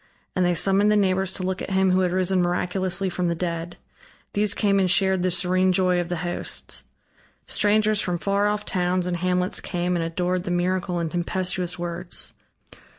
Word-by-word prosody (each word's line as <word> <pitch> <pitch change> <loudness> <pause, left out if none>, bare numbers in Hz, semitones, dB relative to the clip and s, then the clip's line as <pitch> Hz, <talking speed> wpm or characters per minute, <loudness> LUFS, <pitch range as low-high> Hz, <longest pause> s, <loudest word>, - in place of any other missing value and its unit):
And 185 - +2
they 175 0 +2
summoned 195 +4 +3
the - - +4
neighbors 190 -2 +1
to 185 - -3
look 185 0 -2
at - - -5
him 190 -1 +2
who 185 - +3
had 180 -1 +1
risen 185 0 +1
miraculously 180 +2 -1
from 180 0 -1
the 170 - 0
dead. 170 0 -4 0.6
These 210 0 +1
came 200 -2 +2
and 185 -1 +2
shared 190 0 +3
the 185 - +1
serene 185 +1 +2
joy 180 -1 +2
of 175 0 -3
the 175 - -1
hosts. 175 - -4 0.6
Strangers 215 0 +2
from 175 -1 -1
far 200 +3 +1
off 210 0 -1
towns 180 -1 0
and 180 -1 -1
hamlets 180 +1 0
came 180 0 -1
and 170 - 0
adored 180 +2 -1
the 185 - -5
miracle 180 0 0
in 165 -1 -2
tempestuous 180 0 -2
words. 175 0 -3
185 Hz, 190 wpm, -24 LUFS, 175-190 Hz, 0.6 s, the